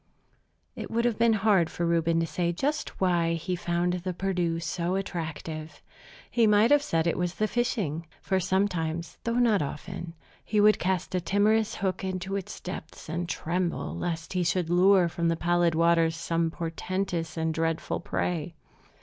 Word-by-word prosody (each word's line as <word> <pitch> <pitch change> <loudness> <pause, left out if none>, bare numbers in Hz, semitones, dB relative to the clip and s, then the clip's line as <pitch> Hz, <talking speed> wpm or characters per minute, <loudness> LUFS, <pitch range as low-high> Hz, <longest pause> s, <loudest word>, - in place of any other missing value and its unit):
It - - -6
would 235 +1 0
have 235 -3 0
been 230 -1 +5
hard 190 -7 +4
for 170 - -2
Reuben 165 0 +2
to - - +1
say 170 +1 -1
just 290 - -2
why 175 -3 +2
he 180 +3 -2
found 175 0 0
the 180 0 -3
Perdu 180 -3 0
so 175 +1 -2
attractive. 160 -4 -5 0.5
He 230 -2 +4
might 210 +3 +5
have 290 0 +6
said 165 - 0
it 170 - 0
was 175 0 -1
the 215 - +1
fishing; 200 - -1
for 190 -1 0
sometimes, 175 -3 -1
though 230 0 0
not 230 -6 +4
often, 170 +4 -6 0.3
he 210 - 0
would 210 0 +5
cast 185 0 -1
a 180 - +1
timorous 215 +4 +2
hook 190 -1 -2
into 190 +1 -3
its 195 -2 -5
depths 180 -4 -8
and 170 +2 -3
tremble 175 +1 -2
lest 165 -2 -3
he 180 -1 +1
should 170 0 0
lure 185 0 +5
from 170 0 -1
the 165 - +2
pallid 175 0 +2
waters 165 0 +3
some 165 0 0
portentous 165 0 -3
and 160 0 0
dreadful 165 0 -1
prey. 170 -1 -2
175 Hz, 170 wpm, -27 LUFS, 165-195 Hz, 0.5 s, have